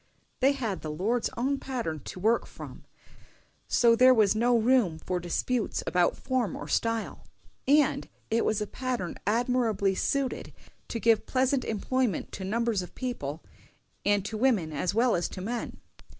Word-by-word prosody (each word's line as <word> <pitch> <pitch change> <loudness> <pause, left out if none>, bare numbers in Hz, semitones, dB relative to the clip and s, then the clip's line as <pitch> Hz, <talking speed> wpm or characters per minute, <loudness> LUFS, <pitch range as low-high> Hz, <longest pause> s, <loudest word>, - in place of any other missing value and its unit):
They 275 +2 +4
had 230 -9 -3
the 155 - -5
Lord's 210 +10 0
own 270 +3 0
pattern 235 - -3
to - - -7
work 225 +5 +2
from, - - -11 0.8
so 235 -1 +4
there 255 +2 +7
was 215 -3 +4
no 235 +2 +3
room 230 -8 +3
for 180 +3 -3
disputes 210 +7 -1
about 180 -1 +2
form 260 -5 -1
or - - -7
style; 230 -1 -1 0.4
and 290 0 +3 0.2
it 230 +1 +2
was 215 -1 0
a - - 0
pattern 245 -6 -4
admirably 225 -3 +1
suited 270 +6 -1 0.3
to 230 - -4
give 225 -1 +3
pleasant 260 +1 +1
employment 225 -1 -1
to 190 - -6
numbers 225 +1 0
of 180 - -10
people, 165 - -4 0.6
and 205 -1 +2
to 215 +1 -4
women 215 -11 +2
as 180 +6 -1
well 240 +1 +3
as 175 - -1
to - - -8
men. 230 +6 -4
230 Hz, 160 wpm, -28 LUFS, 195-255 Hz, 0.8 s, there